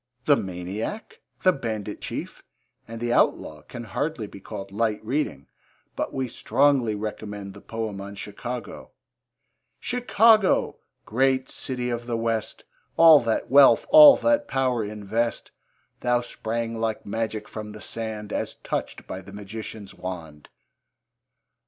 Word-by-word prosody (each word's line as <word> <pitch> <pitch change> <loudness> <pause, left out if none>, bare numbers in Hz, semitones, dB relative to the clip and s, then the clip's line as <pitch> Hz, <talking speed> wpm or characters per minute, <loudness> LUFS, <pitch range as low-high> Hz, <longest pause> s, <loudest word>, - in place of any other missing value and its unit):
The 145 - +6
Maniac, 95 - -5 0.2
The 185 - +5
Bandit 110 - -5
Chief, - - -6 0.5
and 115 0 -7
The 120 0 -1
Outlaw 75 -9 +1
can 120 +7 -9
hardly 125 +2 -3
be 100 - -11
called 95 +1 -8
light 110 0 0
reading, 120 - -2 0.5
but - - -2
we 130 -1 -2
strongly 125 -2 +2
recommend 105 -1 -6
the - - -13
poem 110 -3 -5
on 100 +1 -8
Chicago: 105 +2 -7 0.9
Chicago! 225 -4 +3 0.3
great 130 +3 +1
city 125 -2 -3
of 120 0 -4
the 120 -1 -1
West! 115 -1 -2 0.3
All 165 -2 +9
that 115 0 -2
wealth, 140 0 +7
all 300 -2 +10
that 290 0 +2
power 130 -4 0
invest; 105 +3 -2 0.5
Thou 125 0 +2
sprang 115 -1 -4
like 110 -1 -2
magic 110 0 -3
from 105 0 -7
the 105 - -10
sand, 110 -2 -5
As - - -3
touched - - -4
by - - -6
the - - -13
magician's 105 0 -8
wand. 80 -5 -8
115 Hz, 135 wpm, -25 LUFS, 105-130 Hz, 0.9 s, all